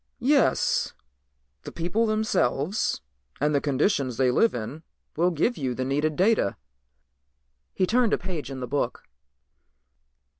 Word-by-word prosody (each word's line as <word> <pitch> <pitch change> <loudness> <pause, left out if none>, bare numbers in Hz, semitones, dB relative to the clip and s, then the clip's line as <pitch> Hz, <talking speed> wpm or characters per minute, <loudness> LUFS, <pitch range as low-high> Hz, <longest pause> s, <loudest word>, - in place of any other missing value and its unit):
"Yes, 275 +1 +2 0.7
the - - -8
people 180 +7 0
themselves 215 - 0 0.4
and 150 +2 +1
the 140 - +2
conditions 140 - 0
they 130 -2 +3
live 225 - +3
in 120 +7 -5 0.3
will 175 +3 +3
give 180 +9 0
you 130 -3 -2
the 130 - -2
needed 145 +3 0
data." 195 - +2 1.2
He 185 - +2
turned 235 +2 +2
a - - +3
page 175 -8 -5
in 135 -1 -6
the 125 - -4
book. 145 - -2
155 Hz, 135 wpm, -26 LUFS, 135-215 Hz, 1.2 s, they